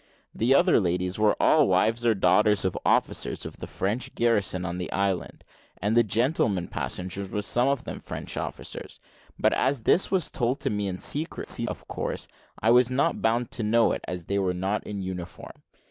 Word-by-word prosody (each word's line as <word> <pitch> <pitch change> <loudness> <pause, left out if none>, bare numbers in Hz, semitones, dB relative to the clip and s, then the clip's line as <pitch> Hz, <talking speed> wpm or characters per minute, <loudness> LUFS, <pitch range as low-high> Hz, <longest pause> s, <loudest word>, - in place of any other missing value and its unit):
The 125 +4 +2
other 175 0 +5
ladies 90 0 -1
were 105 -1 +3
all 155 -3 +4
wives 110 +5 +2
or 115 - +4
daughters 100 +2 +3
of 95 - 0
officers - - 0
of - - -8
the - - -7
French 105 +6 -3
garrison 100 -6 +1
on 90 0 -4
the 90 - -4
island, 95 -3 -2 0.4
and 105 +3 0
the 120 - +7
gentlemen 110 - 0
passengers 95 +2 -4
were 105 +1 -3
some 120 +4 +2
of 140 -2 0
them - - -6
French - - -6
officers; - - -6 0.4
but - - +2
as 135 -4 0
this 180 - +3
was 185 -5 0
told 125 +3 -1
me 105 -1 -1
in 90 -1 -3
secrecy, 155 - -1
of - - -7
course - - -4 0.4
I 110 - +5
was 125 0 +5
not 140 +6 0
bound 115 +2 +1
to 130 - -3
know 115 +2 +3
it, - - -2
as 90 -2 -5
they 100 +3 -1
were 90 -2 0
not 95 +4 -2
in 100 -2 -4
uniform. 90 -1 -7
105 Hz, 190 wpm, -26 LUFS, 95-120 Hz, 0.4 s, the